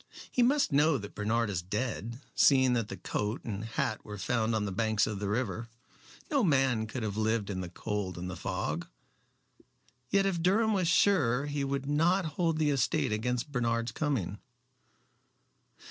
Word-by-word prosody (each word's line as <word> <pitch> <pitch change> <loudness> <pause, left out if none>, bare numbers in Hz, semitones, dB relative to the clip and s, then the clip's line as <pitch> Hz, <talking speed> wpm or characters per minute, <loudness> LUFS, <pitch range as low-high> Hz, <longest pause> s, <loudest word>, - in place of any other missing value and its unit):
"He 250 - +2
must 275 +4 +3
know 145 +1 +4
that 105 -3 -8
Bernard 110 +1 0
is 90 -3 -2
dead, 115 +4 -3
seeing 130 -3 +5
that 115 -3 0
the - - -7
coat 105 +2 -3
and 105 -2 -4
hat 110 -1 -2
were 105 0 -7
found 110 +3 0
on 105 -1 0
the 100 - -3
banks 110 +1 +1
of 105 -3 -4
the 100 -1 -2
river. 115 0 -2 0.6
No 280 -4 +3
man 130 - +2
could 120 +2 -5
have 105 -1 -3
lived 110 -1 0
in 95 -1 -3
the 90 - -5
cold 95 -1 -4
and 90 +1 -5
the 90 - -5
fog. - - -3 1.2
Yet 195 0 +3
if 185 -4 0
Durham 215 +5 +3
was 185 -4 +1
sure 145 -8 +3
he 145 -1 -2
would 140 0 -2
not 165 +6 +2
hold 160 +1 0
the 155 -2 +2
estate 135 -5 +1
against 125 +6 -1
Bernard's 115 -2 0
coming." 115 - -2
115 Hz, 175 wpm, -30 LUFS, 105-145 Hz, 1.2 s, seeing